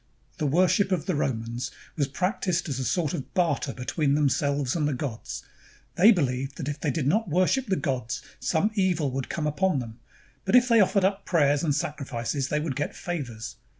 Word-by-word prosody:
The 150 - +1
worship 185 +6 +3
of 180 -4 0
the 185 - 0
Romans 120 -3 -2 0.3
was 145 -4 +1
practiced 180 - -1
as 135 -3 -3
a - - -1
sort 155 +2 0
of 135 - -6
barter 160 -6 +1
between 140 +3 0
themselves 140 -1 +1
and 150 -3 +1
the 145 - 0
gods. 125 -4 -5 0.5
They 205 +6 +7
beHeved 135 - 0
that 145 - -5
if 145 +1 -3
they 150 - -1
did 150 -1 -1
not 195 +7 +2
worship 185 - +2
the 195 - +2
gods, 130 -9 -2 0.2
some 185 +6 +1
evil 180 -8 +1
would 135 0 -3
come 160 - -2
upon 155 +2 +1
them; 115 -2 -6 0.4
but 190 - -2
that - - +10
if 250 0 +4
they 230 -1 +6
offered 195 -1 +4
up 195 +1 0
prayers 145 -4 +3
and 150 -4 +1
sacrifices, 140 -2 -2
they 150 - 0
would 150 -3 -2
get 145 - -3
favors. 130 -11 -5
150 Hz, 200 wpm, -26 LUFS, 135-180 Hz, 0.5 s, that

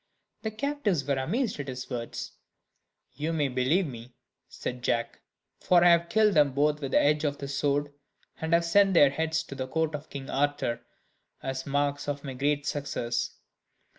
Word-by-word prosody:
The 220 - -2
captives 220 - -1
were 140 -1 0
amazed 210 - -1
at 140 - -4
his 130 -1 -5
words. 120 -3 -5 0.8
"You 155 +3 -2
may 150 -4 +1
believe 130 +9 +2
me," 120 -3 -9 0.3
said 125 0 -5
Jack, 115 -1 -1 0.4
"for 175 -1 +4
I 175 - +7
have 170 0 +4
killed 215 0 +4
them 145 -4 +4
both 150 +2 +1
with 135 - -3
the - - +6
edge 150 +1 +2
of 145 -1 0
this 140 0 -5
sword, 145 0 0 0.5
and 160 0 -3
have 170 0 +4
sent 195 +2 +4
their 145 -4 +7
large 140 - -9
heads 160 0 0
to - - -9
the 130 -1 -4
court 160 +3 -1
of 150 +1 -6
King 135 -1 -7
Arthur, 140 -4 0 0.6
as 130 0 -4
marks 145 0 0
of 145 -1 -3
my 135 -3 -5
great 145 +2 0
success." 140 -5 -2
145 Hz, 185 wpm, -28 LUFS, 135-160 Hz, 0.8 s, I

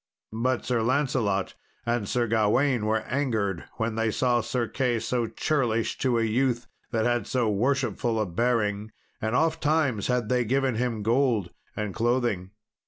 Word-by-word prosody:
But 125 +3 0
Sir 120 -2 +1
Lancelot 125 -6 0 0.3
and 120 -4 -1
Sir 120 -1 +1
Gawain 115 +2 +2
were 110 0 +1
angered 110 -10 -1
when 115 0 -2
they 115 0 0
saw 120 +2 +2
Sir 120 +1 -1
Key 125 -3 0
so 120 +1 -1
churlish 120 -5 0
to 125 -3 +2
a 115 - +2
youth 120 +2 +1 0.2
that 110 -2 0
had 120 -3 +1
so 120 -4 +1
worshipful 120 0 0
a 110 - +1
bearing, 105 +1 0 0.3
and 110 +2 -1
ofttimes 155 -6 +1
had 125 -3 0
they 125 +1 +2
given 135 +2 +1
him 115 -2 -1
gold 115 -5 +2 0.3
and 105 -2 -2
clothing. 120 -5 0
120 Hz, 155 wpm, -26 LUFS, 110-125 Hz, 0.3 s, Gawain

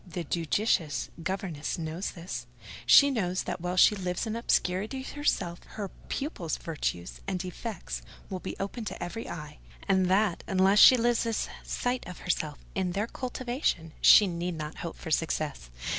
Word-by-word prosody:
The 175 0 -4
judicious 165 - 0
governess 175 -4 -3
knows 165 +3 -3
this: 165 -9 -6 0.4
she 285 0 +8
knows 185 -7 0
that, 175 - -4
while 180 +1 -2
she 210 - +7
lives 180 -1 -2
in 220 0 -3
obscurity 220 +2 0
herself, 265 -12 -1 0.2
her 200 -2 -3 0.2
pupils' 230 - -2
virtues 145 - -4
and 190 -2 -1
defects 185 +5 -5 0.3
will 185 - -4
be 190 - -5
open 200 +4 -3
to - - -5
every 200 +6 -5
eye; 150 -3 -7 0.3
and 190 -2 +3
that, 190 -1 +2
unless 190 +2 +4
she 255 - +10
loses 230 -1 +1
sight 250 0 -1
of 180 - -7
herself 155 -4 -1 0.2
in 185 -2 -1
their 205 +3 0
cultivation, 245 - -2
she 210 - +9
need 175 -1 -2
not 155 0 -6
hope 170 - -6
for 160 - -7
success. 155 - -1
185 Hz, 160 wpm, -29 LUFS, 165-215 Hz, 0.4 s, she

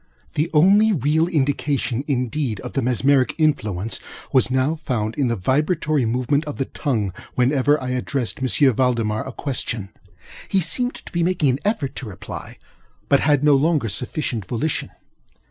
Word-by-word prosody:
The 155 +3 0
only 200 +8 +5
real 160 - +2
indication, 140 -5 0
indeed, 125 -4 -1
of - - -7
the 135 - 0
mesmeric 130 +1 +2
influence, 110 - 0 0.3
was 130 -1 +4
now 130 +4 +1
found 125 -9 -2
in 140 -1 0
the 115 - 0
vibratory 150 - +1
movement 130 +5 +1
of 150 - -6
the 135 - -1
tongue, 110 - -2 0.2
whenever 135 +3 +3
I 130 - -4
addressed 125 -1 -2
M. 130 0 +3
Valdemar 115 -3 0
a - - -5
question. 120 -7 -3 0.6
He 195 - +2
seemed 245 +9 +1
to - - -11
be 170 - -1
making 165 -5 +2
an 130 - -2
effort 160 - -1
to 130 - -5
reply, 95 -5 -8 0.5
but 140 - +5
had 145 -1 +2
no 150 -1 +6
longer 145 -4 +2
sufficient 120 -2 -3
volition. 125 - -2
135 Hz, 160 wpm, -22 LUFS, 120-150 Hz, 0.6 s, no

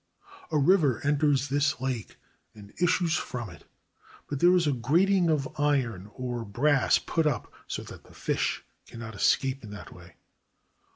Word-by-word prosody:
A 155 - +2
river 145 - +3
enters 145 -1 +2
this 145 0 +1
lake 130 -4 -4 0.4
and 100 -1 -14
issues 175 -2 +2
from 120 -6 -5
it, 85 - -15 0.6
but 145 - -4
there 175 +3 +6
is 175 -2 +3
a 145 - +2
grating 170 +9 +2
of 145 -4 +1
iron 120 -10 0
or 125 -2 -4
brass 135 +7 +2
put 165 -2 0
up 145 - -2
so - - -4
that - - -12
the - - -17
fish - - -1 0.2
cannot 115 -1 -8
escape 130 +6 +1
in 105 - -9
that 105 0 -10
way. 85 -2 -15
135 Hz, 160 wpm, -28 LUFS, 115-155 Hz, 0.6 s, there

